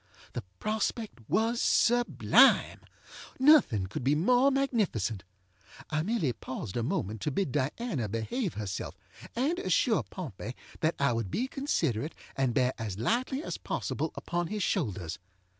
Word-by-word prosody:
The - - -3 0.2
prospect 215 - -2
was 230 +2 +2
sublime. 240 +1 +4 0.6
Nothing 260 - +5
could 105 +6 -5
be 140 +4 +3
more 245 - +4
magnificent. 210 - 0 0.7
I 155 0 +1
merely 170 - 0
paused 115 -2 -6
a 120 - 0
moment 110 -2 -2
to - - 0
bid 150 0 -1
Diana 145 - -1
behave 130 - -2
herself, 100 -3 -4 0.4
and 290 +9 +1
assure 370 - +2
Pompey - - -7 0.2
that 160 0 +1
I 140 -3 +2
would 115 -4 -2
be 250 - -1
considerate 160 - -1 0.2
and 130 -3 0
bear 125 +1 +3
as 105 -4 -4
lightly 255 - 0
as - - -5
possible - - -2
upon 175 0 -2
his 210 +1 -2
shoulders. 100 - -1
155 Hz, 140 wpm, -30 LUFS, -, 0.7 s, Nothing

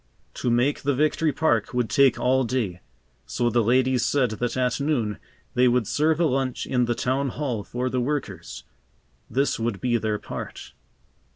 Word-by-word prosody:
To 125 - -2
make 125 +5 +2
the 140 -1 0
Victory 155 +2 +2
Park 125 -7 0
would 125 -2 +1
take 135 +3 +4
all 130 +1 +2
day, 110 -8 -2 0.5
so 120 -1 0
the 120 - +3
ladies 125 +3 +2
said 130 -5 +2
that 120 +3 -2
at 125 0 0
noon 120 -9 -1 0.3
they 125 0 +4
would 125 -1 +2
serve 155 - +1
a 170 - +3
lunch 135 -3 -1
in 125 -2 +1
the 120 0 -1
Town 135 +3 0
Hall 125 -6 -3
for 125 +4 -3
the 130 0 -1
workers. 145 +2 -4 0.7
This 135 -1 0
would 115 -3 -2
be 120 -2 +1
their 110 -1 -1
part. - - -8
125 Hz, 175 wpm, -24 LUFS, 120-140 Hz, 0.7 s, take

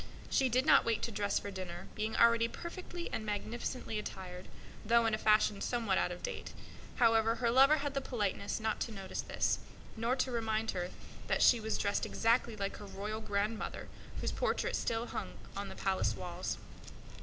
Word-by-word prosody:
She 265 -1 +3
did 255 +3 +2
not - - +7
wait 230 -2 0
to 235 - -1
dress 205 -1 0
for 200 - -3
dinner, 185 -2 -6
being 215 +1 -2
already 230 0 +5
perfectly 345 +4 -6
and 220 - -2
magnificently 220 +2 -3
attired, 185 -3 -7 0.4
though 235 +2 +4
in 225 - +2
a - - +2
fashion 215 -2 +3
somewhat 225 -6 +1
out - - +1
of 175 - -7
date. - - -5 0.4
However, 225 0 +4
her 235 -1 +1
lover 270 +5 +7
had 285 -1 -2
the 275 - 0
politeness 205 -5 -2
not 220 0 -1
to 230 - -2
notice 195 -3 -4
this, - - 0 0.4
nor 230 +3 +1
to 260 0 0
remind 225 -1 0
her 180 -1 -3 0.4
that - - +2
she 240 - +7
was 220 0 -1
dressed 200 0 0
exactly 230 0 +2
like 200 -1 -3
his 205 - -9
grandmother 210 +1 -3 0.3
whose - - 0
portrait - - 0
still 230 0 -1
hung - - -5 0.2
on - - -4
the - - -8
palace - - 0
walls. - - -4
220 Hz, 180 wpm, -34 LUFS, 205-235 Hz, 0.4 s, not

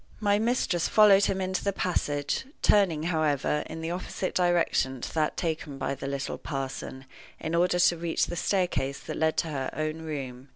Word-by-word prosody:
My 205 -1 +2
mistress 220 -7 +1
followed 205 -2 +6
him 190 - 0
into 185 0 -2
the 200 - +1
passage, 150 - -1 0.2
turning, 180 -7 +4
however, 150 -3 +1
in 160 0 -7
the 165 +1 -3
opposite 185 +1 -3
direction 170 -7 +1
to - - -6
that 155 -1 0
taken 160 -4 -3
by 140 - -2
the 135 0 -6
little 140 0 -3
parson, 135 -1 -5 0.3
in 160 - -4
order 175 +1 +3
to 175 -1 +4
reach 165 0 0
the 175 - -5
staircase 175 -7 0
that - - -6
led 160 0 +1
to 165 - 0
her 135 -3 -2
own 155 +1 -2
room. 135 -4 -6
160 Hz, 180 wpm, -28 LUFS, 145-180 Hz, 0.3 s, followed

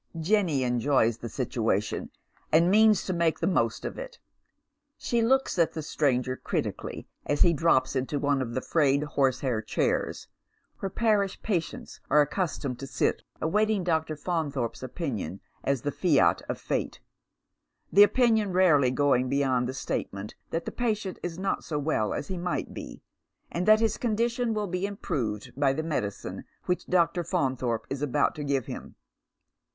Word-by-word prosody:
Jenny 165 -6 +2
enjoys 120 -2 +2
the 115 - -6
situation, 110 -4 -1 0.4
and 170 +3 +5
means 215 0 +5
to 185 - -1
make 170 -2 +1
the - - -2
most 190 - +1
of - - -5
it. - - -8 0.8
She 235 -1 0
looks 260 -4 +2
at 165 - +3
the 160 - -4
stranger 130 -4 0
critically, - - -4 0.2
as 145 - +3
he 170 - +4
drops 140 -4 +2
into 135 +3 -1
one 140 -1 +1
of 120 -2 -4
the 130 - 0
frayed 140 -2 +2
horsehair 130 -5 0
chairs, - - -1 0.5
where 195 - -2
parish 205 -2 +1
patients 175 -7 -3
are 150 - +5
accustomed 145 -5 -2
to 135 - -6
sit 125 -1 0 0.2
awaiting 210 +4 +2
Dr. 160 -2 0
Faunthorpe's 145 -7 -2
opinion 120 - -4 0.2
as 135 -3 0
the 145 - -1
fiat 160 -4 +3
of - - -2
fate - - -2 0.5
— - - -32
the 200 - +7
opinion 220 -1 +4
rarely 160 -8 +5
going 130 -1 +2
beyond 130 -3 +1
the - - -3
statement 100 -5 -4 0.2
that 165 +1 -2
the - - -4
patient 215 -5 -2
is 170 -1 -4
not 195 +1 -1
80 155 - -5
well 145 -8 0
as - - -4
he 185 -2 -4
might 175 0 -3
be, - - -9 0.5
and 180 +3 -2
that 215 0 +7
his 220 -2 +1
condition 235 0 0
will 210 -1 -1
be 180 +1 -2
improved 125 - -3
by 140 -1 +2
the 155 +3 -2
medicine 125 -11 -3 0.2
which 180 - -1
Dr. 175 0 +2
Faimthorpe 130 - -1
is 135 0 -3
about 145 0 +1
to 150 - -6
give 140 -4 0
him. - - -8
155 Hz, 165 wpm, -27 LUFS, 130-190 Hz, 0.8 s, the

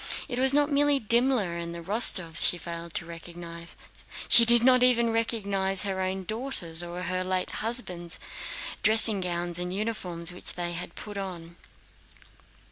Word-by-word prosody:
It 245 - -5
was 265 0 +1
not 290 +1 +1
merely 285 0 +2
Dimmler 235 -5 +2
and 170 0 -6
the 170 - -8
Rostóvs 180 -4 0
she 175 - +6
failed 170 0 -8
to - - -3
recognize, 170 0 -11 0.5
she 235 - +10
did 235 0 +8
not 255 0 +4
even 235 -2 +2
recognize 200 -4 -1
her 190 -2 -3
own 190 0 -4
daughters, 215 -6 -2
or 175 +1 -7
her 185 +1 -3
late 185 0 -3
husband's, 180 -7 -5 0.6
dressing 220 -2 +5
gowns 175 -1 -4
and 180 0 -5
uniforms, 185 -5 -4
which 180 - -6
they 175 -1 -3
had 175 +1 -7
put 205 -1 -8
on. 170 -3 -8
185 Hz, 155 wpm, -26 LUFS, 175-230 Hz, 0.6 s, she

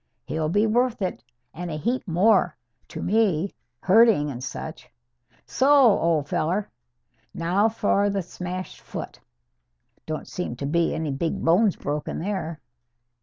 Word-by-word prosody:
He'll 155 -1 -2
be 205 +6 +3
worth 240 0 +1
it, 185 - -3 0.3
and 175 +2 -6
a 155 - -4
heap 240 - -2
more, 180 - +3 0.3
to - - -7
me, 200 -4 +1 0.3
herding 195 -7 +5
and 125 -1 -7
such. 145 +5 -7 0.6
So, 265 +2 +1
old 180 - +4
feller! 180 +8 -1 0.6
Now 185 +6 +2
for 205 -2 +1
the 200 -2 -1
smashed 180 +1 -6
foot. - - -7 0.9
Don't 155 -1 -4
seem 180 -9 -4
to 140 - -5
be 170 +3 +1
any 160 -2 -2
big 160 +5 -2
bones 185 +4 +4
broke 145 +1 -3
there." 170 -4 -4
180 Hz, 135 wpm, -24 LUFS, 160-210 Hz, 0.9 s, herding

